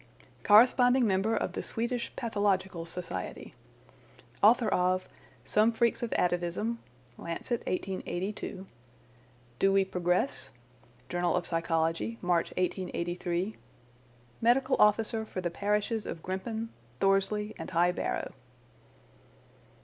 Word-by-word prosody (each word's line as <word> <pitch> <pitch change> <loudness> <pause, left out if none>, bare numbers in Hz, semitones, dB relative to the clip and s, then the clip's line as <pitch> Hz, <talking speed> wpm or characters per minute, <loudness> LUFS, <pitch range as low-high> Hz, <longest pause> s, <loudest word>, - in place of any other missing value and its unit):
Corresponding 245 +3 +6
member 205 +2 +1
of - - -1
the - - -3
Swedish 235 +1 -2
Pathological 195 -6 -1
Society. 165 - -6 0.9
Author 225 +2 +6
of 185 +1 +1 0.4
'Some 215 +2 +3
Freaks 235 0 +1
of 235 - -3
Atavism' 180 +6 0 0.4
(Lancet 195 +8 -3
1882). 190 +1 -3 0.9
'Do 195 - +4
We 195 0 +4
Progress?' 180 -7 0 0.6
(Journal 175 +4 0
of - - 0
Psychology, 165 +5 0
March, 175 -2 +1
1883). 180 +1 -2 0.9
Medical 255 +3 +3
Officer 220 +1 +3
for 215 - -6
the 175 -2 -2
parishes 210 +3 -1
of 165 - -6
Grimpen, 220 +5 -4 0.3
Thorsley, 195 +2 +1
and 165 - -6
High 175 0 +3
Barrow." - - -3
195 Hz, 105 wpm, -30 LUFS, 175-225 Hz, 0.9 s, Corresponding